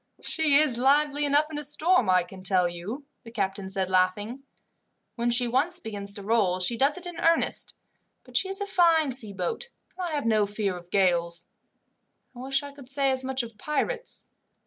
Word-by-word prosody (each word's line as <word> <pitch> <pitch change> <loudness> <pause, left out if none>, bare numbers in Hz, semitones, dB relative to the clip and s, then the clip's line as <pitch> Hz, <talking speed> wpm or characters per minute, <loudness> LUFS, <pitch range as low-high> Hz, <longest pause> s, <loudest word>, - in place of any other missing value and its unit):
"She 315 -3 +1
is 280 -5 +4
lively 290 +2 +3
enough 295 +2 +2
in 295 - -4
a - - -5
storm, 300 - +3
I 185 -1 +4
can 190 +2 -12
tell 185 -1 +2
you," 190 - -6 0.2
the 230 - -11
captain 195 -3 -3
said, 190 -1 +1
laughing. 205 +7 +1 0.7
"When 235 0 0
she 240 +1 +2
once 295 +9 +1
begins 200 - -3
to 200 - -8
roll 200 -4 +1
she 185 +6 +1
does 275 +6 +2
it 365 - -8
in 350 -1 -7
earnest, 330 0 +2 0.5
but - - -17
she 380 - +1
is 390 - +1
a 405 - -2
fine 335 -7 +3
sea 240 -5 -1
boat, 190 - -4 0.3
and 365 -1 -3
I 325 - -5
have 285 - -2
no 215 -2 +2
fear 205 -2 -2
of 175 0 -11
gales. 170 -3 +1 0.9
I - - -10
wish 270 +2 -1
I 285 - -8
could 280 -3 -14
say 275 0 +1
as 260 0 -1
much 260 -1 -1
of 225 -2 -10
pirates. 475 +11 -3
245 Hz, 200 wpm, -26 LUFS, 195-295 Hz, 0.9 s, is